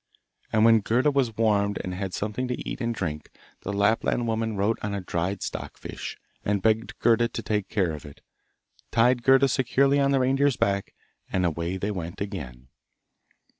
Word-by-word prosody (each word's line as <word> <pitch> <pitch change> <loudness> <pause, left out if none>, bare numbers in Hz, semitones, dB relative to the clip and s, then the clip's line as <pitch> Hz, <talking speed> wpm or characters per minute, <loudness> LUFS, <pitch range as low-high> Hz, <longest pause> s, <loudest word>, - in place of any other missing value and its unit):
And 110 0 +4
when 115 -1 +7
Gerda 125 +8 +2
was 130 -6 0
warmed 105 -2 +2
and 90 - -4
had 90 - -6
had 95 -2 -3
something 110 +5 -2
to 125 - -4
eat - - -4
and 120 0 0
drink, 80 -9 -4 0.3
the 100 - -4
Lapland 110 +4 +1
woman 110 -1 -1
wrote 105 +4 +1
on 100 -1 -2
a - - -2
dried 90 +2 -2
stock - - -5
fish, - - -7 0.3
and 100 -2 0
begged 110 -1 +1
Gerda 120 0 +3
to - - -5
take 105 -2 -1
care 95 -6 +1
of 75 -2 -7
it, 75 - -13 0.7
tied 120 +2 +3
Gerda 135 +2 +5
securely 135 +2 +2
on 140 0 +3
the 135 - +3
reindeer's 135 +1 +2
back, 100 0 0 0.4
and 90 -1 +1
away 85 +2 -1
they 100 +3 -2
went 90 -1 -5
again. 65 - -6
105 Hz, 185 wpm, -26 LUFS, 95-120 Hz, 0.7 s, when